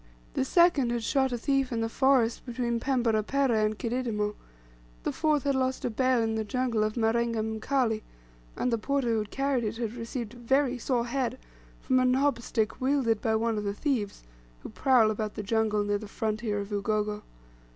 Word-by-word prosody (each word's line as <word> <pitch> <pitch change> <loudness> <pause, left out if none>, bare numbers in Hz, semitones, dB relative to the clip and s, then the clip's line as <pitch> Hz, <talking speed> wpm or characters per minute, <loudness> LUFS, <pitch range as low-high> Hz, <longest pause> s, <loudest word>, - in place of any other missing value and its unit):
The - - +1
second 300 -3 +4
had 240 -1 -2
shot 265 +2 +1
a 245 - -1
thief 270 +1 0
in 230 -1 -1
the 225 - 0
forest 245 -1 +2
between 235 -1 -2
Pembera 235 -4 +1
Pereh 240 -1 +1
and 215 0 0
Kididimo; 225 -4 -1 0.7
the - - -1
fourth 300 -3 +1
had 280 -1 +1
lost 260 0 -1
a 245 - -1
bale 255 0 +2
in 225 0 0
the 220 0 -1
jungle 235 0 0
of 215 0 -1
Marenga 230 0 +1
Mkali, 220 +1 0 0.6
and 250 - 0
the 230 - +1
porter 275 +1 0
who 225 -2 +1
carried 270 +2 -1
it 220 +1 -3
had 230 -2 -3
received 235 -1 -5
a - - -12
"very 255 +1 +1
sore 240 -1 0
head" 250 0 -2 0.4
from 255 -1 +2
a 255 - +3
knob 265 0 +2
stick 220 0 -2
wielded 255 -5 +1
by 220 -1 +1
one 225 -1 0
of - - -4
the 200 0 -2
thieves, 225 - -2 0.4
who - - -7
prowl 235 - +3
about 215 0 -3
the 210 - -4
jungle 215 0 +1
near 205 0 0
the 215 - -8
frontier 215 0 -2
of 200 +1 -6
Ugogo. 210 0 -1
235 Hz, 195 wpm, -28 LUFS, 215-260 Hz, 0.7 s, second